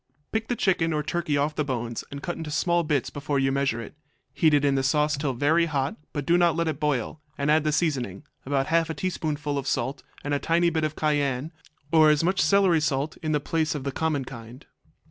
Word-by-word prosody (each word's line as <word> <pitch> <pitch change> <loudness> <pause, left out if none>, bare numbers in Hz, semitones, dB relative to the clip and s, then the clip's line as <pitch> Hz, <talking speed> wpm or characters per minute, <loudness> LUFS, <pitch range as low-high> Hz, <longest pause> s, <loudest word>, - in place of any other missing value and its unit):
Pick 220 0 -1
the 245 - -1
chicken 175 -6 +1
or 150 -1 -1
turkey 160 -1 -1
off 145 +2 0
the 150 - -1
bones 120 -4 -3
and 140 0 -8
cut 175 - -3
into 160 -2 -6
small 170 +3 +1
bits 150 -4 0
before 145 0 -2
you 135 0 +2
measure 135 -4 0
it. 115 - -8 0.4
Heat 160 - +3
it 145 0 +2
in 140 - +3
the 135 - +1
sauce 150 +3 +2
till 140 -1 -2
very 160 +6 +3
hot, 140 -3 -1 0.2
but 145 -2 -4
do 175 +1 +4
not 170 -2 +3
let 170 0 0
it 155 -3 -2
boil, 150 0 -1 0.2
and 140 +1 +1
add 155 0 +4
the 155 - +1
seasoning, 140 - -1 0.2
about 135 0 0
half 165 +1 +1
a 160 - -3
teaspoonful 150 -4 -2
of 135 - -6
salt, 130 +1 -1 0.2
and 145 - -2
a 140 - +1
tiny 170 +2 +2
bit 160 -1 -1
of 155 0 -3
cayenne, 145 -1 0 0.4
or 160 -2 +6
as 150 +1 +3
much 185 +3 +2
celery 185 -2 +4
salt 145 0 -1
in 155 -2 -3
the 150 - +2
place 155 +2 -1
of 145 - -4
the 140 - -2
common 150 -2 -1
kind. 120 0 -10
150 Hz, 235 wpm, -26 LUFS, 140-160 Hz, 0.4 s, or